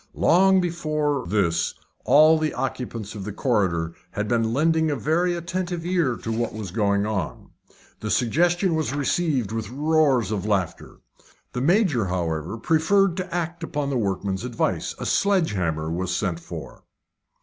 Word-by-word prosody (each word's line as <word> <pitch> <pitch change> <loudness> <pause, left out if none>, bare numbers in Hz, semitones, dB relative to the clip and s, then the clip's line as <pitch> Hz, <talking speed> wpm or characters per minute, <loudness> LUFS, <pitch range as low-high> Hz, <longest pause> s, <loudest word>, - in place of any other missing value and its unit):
Long 190 +2 +4
before 155 -6 -1
this 85 -4 +1 0.3
all 155 +2 +6
the 155 -1 -1
occupants 115 -5 -4
of 105 -3 -6
the 105 - -5
corridor 95 -8 0 0.2
had 105 +3 -3
been 115 -1 +1
lending 160 +4 +2
a 145 - 0
very 165 +8 +1
attentive 175 0 -3
ear 175 -9 +1
to 115 - -3
what 115 +1 -1
was 105 -4 -6
going 100 0 +1
on. 105 -3 -4 0.5
The 105 - -4
suggestion 175 - +2
was 155 -3 -1
received 145 - 0
with 110 -2 -3
roars 140 -5 +2
of 105 -3 -2
laughter. 100 -5 -2 0.5
The 125 - -2
Major, 165 - +3
however, 85 +1 -2
preferred 165 - +2
to 185 - -4
act 170 0 -3
upon 145 -3 -2
the - - -1
workmen's 100 -1 -2
advice. 125 -2 -2
A - - -5
sledge 195 -4 +2
hammer 80 -5 -2
was 90 +1 -1
sent 90 -5 -2
for. - - -9
125 Hz, 155 wpm, -24 LUFS, 100-165 Hz, 0.5 s, all